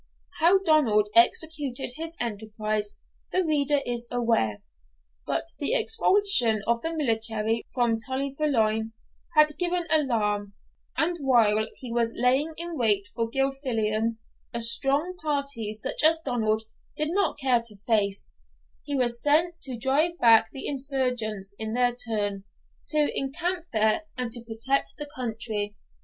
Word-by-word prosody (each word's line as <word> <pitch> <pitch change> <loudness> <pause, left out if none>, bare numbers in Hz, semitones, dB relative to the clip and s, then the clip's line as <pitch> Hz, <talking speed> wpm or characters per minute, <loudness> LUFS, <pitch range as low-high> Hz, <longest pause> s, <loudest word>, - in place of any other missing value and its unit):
How 345 +5 +4
Donald 290 - +2
executed 270 +2 +3
his 330 +2 -5
enterprise 215 -2 -3 0.4
the 370 - +1
reader 295 -3 +1
is 240 -1 -3
aware. 230 - -1 0.6
But - - -1 0.2
the 320 +11 +3
expulsion 400 - +5
of 235 0 0
the 325 - -3
military 225 -6 0
from 235 -3 0
Tully 265 +2 -3
Veolan 225 -7 0 0.4
had 305 0 +4
given 355 -1 -1
alarm, 210 -9 0 0.4
and 340 +2 -1
while 220 -6 +2
he 250 -3 -9
was 230 -1 -1
lying 265 +6 +1
in 340 0 -3
wait 205 -4 +4
for 230 -1 -3
Gilfillan, 230 -4 -1 0.3
a 235 - -3
strong 280 +9 +4
party, 280 -8 -3
such 215 - 0
as 320 +1 +5
Donald 220 -4 -1 0.3
did 305 0 -1
not 395 -2 0
care 260 -4 +1
to 225 -3 -12
face, 200 - -1 0.5
was 245 -4 0
sent 330 +4 +2
to 255 -3 -5
drive 295 +8 0
back 225 -4 +4
the 270 - -6
insurgents 250 -8 -2
in 220 0 -3
their 245 0 +1
turn, 205 -5 -2 0.4
to 300 -1 +3
encamp 335 +6 -3
there, 220 +7 +2
and 250 -2 -4
to 240 0 -1
protect 235 +4 -2
the 295 - -4
country. 220 -4 -4
245 Hz, 135 wpm, -25 LUFS, 220-295 Hz, 0.6 s, expulsion